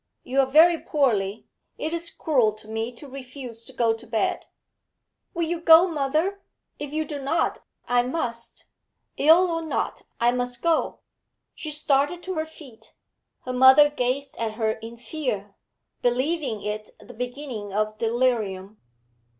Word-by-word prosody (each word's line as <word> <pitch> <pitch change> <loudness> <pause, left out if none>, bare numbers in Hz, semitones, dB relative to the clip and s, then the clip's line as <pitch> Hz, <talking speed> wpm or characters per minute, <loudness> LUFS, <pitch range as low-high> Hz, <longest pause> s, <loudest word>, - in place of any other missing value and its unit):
You 265 +2 -1
are 270 - +4
very 325 +4 +6
poorly; 220 -8 0 0.3
it 315 - -3
is 335 0 -3
cruel 250 -9 +1
to 215 0 -14
me 225 +2 -3
to 280 +5 -12
refuse 255 -3 -9
to - - -10
go 235 -3 +2
to 225 +2 -11
bed.' 225 -1 -1 0.9
'Will 340 - 0
you 335 +1 -2
go, 330 +1 +8
mother? 320 +5 -1 0.4
If 290 -1 -5
you 310 +1 -1
do 290 -2 -6
not, 285 +5 0 0.3
I 245 0 +4
must; 240 -3 -4 0.5
ill 335 +4 +5
or 330 0 -1
not, 320 -2 -2 0.2
I 235 +1 +4
must 245 0 -3
go.' 335 -2 +1 0.5
She 310 - -6
started 300 +3 +1
to 375 - -3
her 315 -2 -2
feet. 280 -8 -15 0.5
Her 255 - -5
mother 265 +4 +7
gazed 275 +1 -2
at 225 -2 -2
her 220 -1 0
in 225 +2 -8
fear, 235 -7 -4 0.5
believing 255 -2 0
it 210 0 -4
the 220 +4 -13
beginning 245 -3 -5
of 215 +1 -1
delirium. 220 -4 0
255 Hz, 150 wpm, -25 LUFS, 225-310 Hz, 0.9 s, go